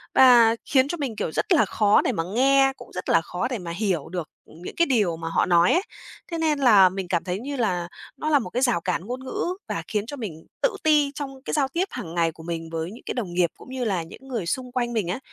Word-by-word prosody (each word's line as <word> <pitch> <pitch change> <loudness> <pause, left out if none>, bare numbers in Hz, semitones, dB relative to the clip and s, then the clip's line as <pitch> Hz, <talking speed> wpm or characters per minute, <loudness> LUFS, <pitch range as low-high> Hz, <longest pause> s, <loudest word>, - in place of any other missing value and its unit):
và 240 -3 +7
khiến 265 -2 +3
cho 345 - -3
mình, 270 -7 -3
kiểu, 185 - -3
rất 405 - +1
là 320 - +5
khó 210 -1 +3
để - - 0
mà 165 -8 -2
nghe, 270 +1 +4
cũng - - -13
rất 180 - -5
là 165 - +4
khó 180 +2 -3
để 250 -1 -3
mà 175 -4 -6
hiểu 180 -4 -1
được 175 -3 -5 0.2
những 170 +3 -10
cái 340 - +3
điều 210 - +1
mà 165 0 -5
họ - - +2
nói 175 0 +4
ấy. 355 - +3 0.5
Thế 335 - -2
nên 310 -3 +1
là 210 -8 +7
mình 190 0 -5
cảm 175 -1 0
thấy 180 +1 -3
như 280 +5 -5
là 180 -9 -1 0.3
nó 310 - -2
là 295 -2 +5
một 200 -8 -5
cái 250 - -2
rào 245 -10 +2
cản 170 - -2
ngôn 250 +3 -5
ngữ, - - -3 0.2
và - - -3
khiến 210 -1 -1
cho 285 +5 -7
mình 165 -9 -7 0.2
tự 485 -5 +2
ti 300 -2 +4
trong 270 -2 -6
cái - - -4
giao 280 -3 +2
tiếp 340 +7 -1
hàng 165 0 -7
ngày 165 -1 +2
của 160 - -14
mình 165 -1 -5
với 165 +2 -4
những 230 - -12
cái - - -3
đồng 205 -9 -4
nghiệp, 175 -1 +2
cũng - - -14
như 260 -1 -3
là 185 -5 0
những 215 +11 -13
người 235 -8 -3
xung 250 +8 -3
quanh 240 -1 -1
mình 215 -6 -1
á. 180 - -2
225 Hz, 275 wpm, -24 LUFS, 175-270 Hz, 0.5 s, và